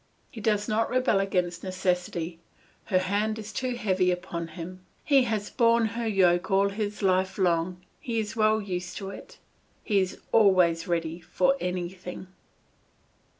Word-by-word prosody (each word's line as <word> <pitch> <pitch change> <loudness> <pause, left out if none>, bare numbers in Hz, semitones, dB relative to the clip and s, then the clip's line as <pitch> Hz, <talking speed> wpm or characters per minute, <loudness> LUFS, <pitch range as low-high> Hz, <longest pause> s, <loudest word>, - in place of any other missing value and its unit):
He 225 - -8
does 210 -1 +1
not 225 0 +1
rebel 255 -5 +2
against 180 -3 -1
necessity, 180 -2 -2 0.5
her 185 - +2
hand 205 +4 0
is 215 0 -8
too 255 +3 -2
heavy 190 -5 +1
upon 170 -2 -3
him; 180 +3 -9 0.2
he 275 -3 +4
has 215 -3 -2
borne 235 -2 +3
her 230 0 -2
yoke 180 -4 +3
all 195 +1 +3
his 210 0 -4
life 185 0 +2
long, 180 -1 0
he 235 -2 -3
is 215 0 -3
well 215 0 +3
used 180 -3 -4
to 195 -2 -5
it; - - -11 0.5
he 205 -3 +2
is 190 -1 -1
always 180 -6 +4
ready 165 -1 -1
for 270 +10 +2
anything. 180 0 -4
190 Hz, 150 wpm, -27 LUFS, 180-215 Hz, 0.5 s, he